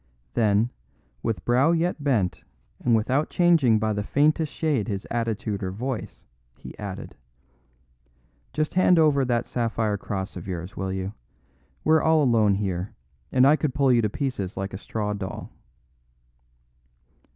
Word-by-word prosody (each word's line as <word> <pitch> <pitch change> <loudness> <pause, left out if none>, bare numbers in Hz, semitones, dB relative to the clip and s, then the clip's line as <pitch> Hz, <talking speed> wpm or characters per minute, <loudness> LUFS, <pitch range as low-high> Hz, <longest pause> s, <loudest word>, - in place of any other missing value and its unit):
Then, 110 +1 +2 0.5
with 115 - -3
brow 130 +7 +4
yet 170 -2 0
bent 105 -11 0 0.4
and 120 -2 +4
without 130 +7 +1
changing 165 -10 +4
by 110 0 0
the 105 - -2
faintest 150 +7 +1
shade 145 -10 0
his 100 -2 -3
attitude 115 -3 -2
or 95 - -2
voice, 120 +4 -5 0.3
he - - -10
added: 100 -3 -6 1.4
"Just 155 0 -1
hand 185 -1 +4
over 150 -4 +4
that 120 -2 0
sapphire 115 -3 -1
cross 95 -1 -4
of 90 0 -8
yours, 90 +2 -5
will 95 0 -3
you? 95 +1 -3 0.7
We're 160 0 +4
all 160 -1 +4
alone 110 -6 +3
here, 95 -1 -3 0.4
and 125 - +5
I 145 +3 +6
could 150 -4 -2
pull 140 -2 +3
you 120 - +4
to 105 - 0
pieces 105 -7 -3
like 95 0 -4
a 95 - -5
straw 105 -1 -3
doll." 95 -2 -6
115 Hz, 150 wpm, -25 LUFS, 100-140 Hz, 1.4 s, I